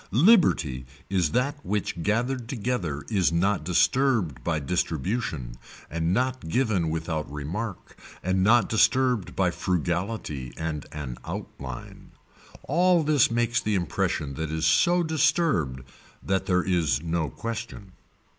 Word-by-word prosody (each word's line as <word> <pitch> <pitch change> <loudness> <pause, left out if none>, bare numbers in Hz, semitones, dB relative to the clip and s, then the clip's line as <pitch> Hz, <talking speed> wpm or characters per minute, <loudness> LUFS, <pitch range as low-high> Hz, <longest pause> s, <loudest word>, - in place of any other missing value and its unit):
Liberty 105 - +4 0.2
is 90 -5 +2
that 140 - -1
which 100 -4 -2
gathered 120 +5 -1
together 105 - -2
is 95 -6 +2
not 95 +4 +1
disturbed 90 - +2
by 80 +2 0
distribution 80 - -2 0.4
and 85 +1 0
not 130 -3 -1
given 105 -7 +1
without 80 -2 -3
remark 85 +8 -5 0.3
and 95 +1 +1
not 120 +4 +5
disturbed 115 -4 +2
by 90 -2 +2
frugality 85 - -2
and 80 -2 -4
an 65 -5 -6
outline. 65 -2 -8 0.5
All 175 +2 +3
this 150 -3 +4
makes 120 0 +1
the 105 -1 0
impression 75 -5 -1
that 80 +2 -4
is 80 +1 -1
so 170 - +4
disturbed 155 - +1 0.4
that 95 -1 -1
there 90 -1 +2
is 85 -5 +1
no 80 -2 -1
question. 110 - -6
95 Hz, 125 wpm, -26 LUFS, 80-120 Hz, 0.5 s, not